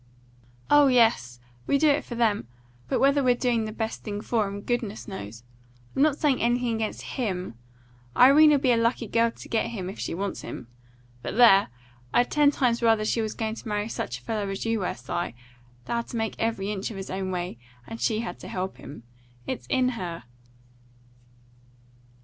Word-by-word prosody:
"Oh 290 -1 +7
yes, 225 - +3 0.3
we 280 - +3
do 310 +2 +3
it 290 0 +3
for 240 - -7
them. 215 - +1 0.4
But - - +1
whether 280 +1 +4
we're 250 -2 +3
doing 240 -3 0
the 215 - -4
best 220 0 -4
thing 205 -2 -4
for 220 -2 0
'em, 200 +1 -6
goodness 225 -2 -3
knows. 115 - -8 0.5
I'm - - +1
not 295 -1 +4
saying 290 -5 +1
anything 240 0 +1
against 220 -1 -3
HIM. 185 - -3 0.6
Irene'll 295 +3 +7
be 265 -2 +2
a 235 - +4
lucky 230 +1 +1
girl 230 +2 +2
to - - -12
get 225 - 0
him, 190 -5 -5
if - - -12
she - - -3
wants 195 +2 -3
him. 120 - -8 0.5
But - - -5
there! 215 -5 +7 0.5
I'd 245 - +3
ten 295 -1 +5
times 245 -4 +1
rather 225 -2 +3
she 230 - +1
was 215 -1 -3
going 220 -1 -2
to 225 - -9
marry 210 0 -1
such 125 - -4
a - - -16
fellow 210 - -2
as 195 +3 -4
you 225 -1 0
were, 185 - -2
Si, 120 - -17
that 175 -2 -3 0.5
had 235 0 -2
to 235 - -5
make 225 -1 -1
every 215 -3 -1
inch 195 -2 -3
of 215 - -7
his 195 - -6
own 190 0 -3
way, 175 -8 -4 0.3
and 225 - -8
she 220 -1 +1
had 235 - -6
to - - -9
help 185 +1 -4
him. 135 -4 -11 0.4
It's 120 0 -5
in 255 - +2
her!" 180 -8 -5
225 Hz, 195 wpm, -26 LUFS, 195-245 Hz, 0.6 s, Oh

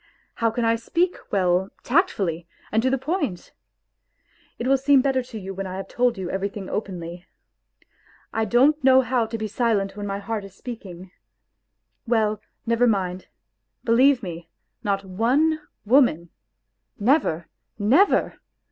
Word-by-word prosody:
How 230 - +1
can 230 +1 -1
I 230 0 +3
speak 345 +10 0 0.2
well, 185 -1 +2
tactfully, 195 - 0 0.2
and 220 - +2
to 260 - +2
the 270 - +1
point? 270 - -3 1.1
It 235 - -4
will 270 +1 +4
seem 275 +1 +5
better 265 -2 +1
to 245 -2 -9
you 195 0 -6
when 195 0 -5
I 185 0 -5
have 195 - -6
told 245 -2 +1
you 190 -2 -4
everything 195 +1 -4
openly.... 175 -3 -5 1.1
I 225 0 0
don't 270 +8 +3
know 260 0 +7
how 245 -2 0
to 225 +1 -4
be 220 -1 -3
silent 210 -3 0
when 205 0 -5
my 195 0 -2
heart 210 +1 -4
is 195 -1 -12
speaking. 190 -7 -9 1.0
Well, 215 -2 +1 0.2
never 235 +1 +3
mind.... 185 -4 -1 0.6
Belie_ve__me, 230 -9 +2 0.4
not 200 -1 0
jone, 250 +12 +1 0.3
woman, 210 - +3 0.7
never, 205 - +1 0.3
never 255 - +3
220 Hz, 140 wpm, -24 LUFS, 195-255 Hz, 1.1 s, know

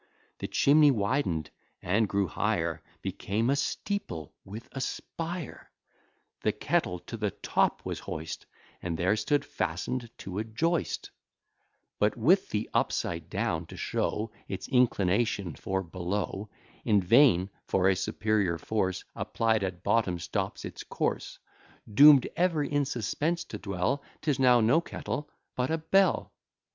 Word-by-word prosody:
The - - -3
chimney 150 +1 +5
widen'd, 100 - 0 0.3
and 100 +4 +1
grew 100 0 +1
higher 80 - -1 0.2
Became 110 +6 -1
a - - +3
steeple 140 - -3
with 110 +6 -9
a 135 - -5
spire. 165 +3 -5 0.7
The - - +2
kettle 90 - 0
to - - -7
the - - 0
top - - 0
was - - -3
hoist, 80 0 -6 0.3
And 85 -2 -3
there 90 +5 +2
stood 125 +7 +1
fasten'd 115 +9 -3
to 95 +1 -5
a - - 0
joist, 165 +10 -1 0.9
But 105 +4 +2
with 170 - +4
the 105 +1 -1
upside 85 -1 -1
down, - - -1
to - - -10
show 110 +1 -1 0.2
Its 95 - -5
inclination 105 - +2
for 95 +7 -2
below: 95 +4 -3 0.3
In 105 -2 +4
vain; 100 -2 +5 0.2
for 95 -1 +2
a 95 - +4
superior 100 -2 0
force 95 -2 -1
Applied 110 -2 0
at 90 -2 -4
bottom 100 -6 +2
stops 85 - -3
its - - -7
course: - - -2 0.6
Doom'd 140 +2 +8
ever 170 -4 +2
in 145 0 +1
suspense 145 +7 -1
to 105 - -8
dwell, 100 +8 -1 0.2
'Tis 145 -3 +1
now 125 -2 +6
no 120 +9 +4
kettle, 150 -3 -5 0.3
but 125 +1 0
a 160 - +1
bell. 190 +4 +2
110 Hz, 140 wpm, -29 LUFS, 95-140 Hz, 0.9 s, Doom'd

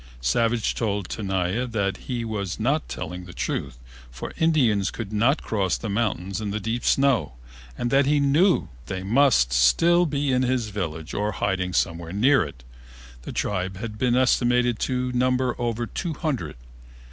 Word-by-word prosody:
Savage 115 - +1
told 100 -4 -2
Tenaya 95 +3 -1
that 100 -4 -1
he 120 -3 -4
was 100 -4 -4
not 140 +8 0
telling 90 +1 -6
the 90 - -12
truth, - - -3 0.3
for - - -7
Indians 125 -12 +3
could 110 -2 -6
not 120 +8 +2
cross 95 -5 0
the 110 - -5
mountains 100 -2 -1
in 105 - -3
the 105 +2 -2
deep 115 +3 -3
snow, 135 - +2 0.4
and 120 - -2
that 135 0 +4
he 145 0 +3
knew 150 +7 +3 0.2
they 95 0 -4
must 110 - +3
still 165 - +4
be 140 -2 0
at 125 - +2
his 125 -3 0
village 80 -6 -5
or 105 +1 -1
hiding 95 -2 -1
somewhere 85 -2 -1
near 130 +6 +4
it. 70 -5 -10 0.6
The - - -7
tribe 95 -1 -2
had 105 0 -6
been 125 -1 +2
estimated 125 -2 +2
to 125 -1 -1
number 125 0 +1
over 120 0 -1
two 165 +5 -4
hundred. 150 -5 -3
115 Hz, 165 wpm, -24 LUFS, 95-130 Hz, 0.6 s, that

